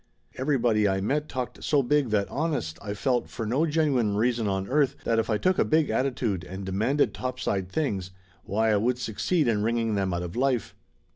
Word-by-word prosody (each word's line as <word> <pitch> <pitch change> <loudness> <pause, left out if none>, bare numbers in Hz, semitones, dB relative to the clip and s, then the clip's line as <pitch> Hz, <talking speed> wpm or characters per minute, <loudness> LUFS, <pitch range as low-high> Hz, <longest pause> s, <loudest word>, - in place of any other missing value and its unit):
Every 135 +2 +1
body 110 -4 +2
I 95 0 +1
met 145 +10 -1
talked 125 -1 -5
so 145 -2 +2
big 140 0 +2
that 105 -2 +1
honest, 145 - -2
I 105 -2 -4
felt, 125 +2 0
for 115 - -5
no 135 +9 +1
genuine 140 -9 +1
reason 115 0 +1
on 95 -1 -1
earth, 140 0 +2
that 115 -1 +1
if 115 - -1
I 110 - +2
took 185 - +1
a - - +5
big 155 -1 +2
attitude 120 -8 -1
and 95 +2 -7
demanded 110 +10 +1
topside 120 -7 -2
things, 100 - -2 0.3
why 110 +3 +1
I 105 - +3
would 120 +4 +1
succeed 125 - 0
in 110 -3 +2
wringing 115 0 0
them 95 -2 0
out 85 0 -2
of 90 +3 -6
life. 125 -5 0
115 Hz, 205 wpm, -26 LUFS, 100-135 Hz, 0.3 s, a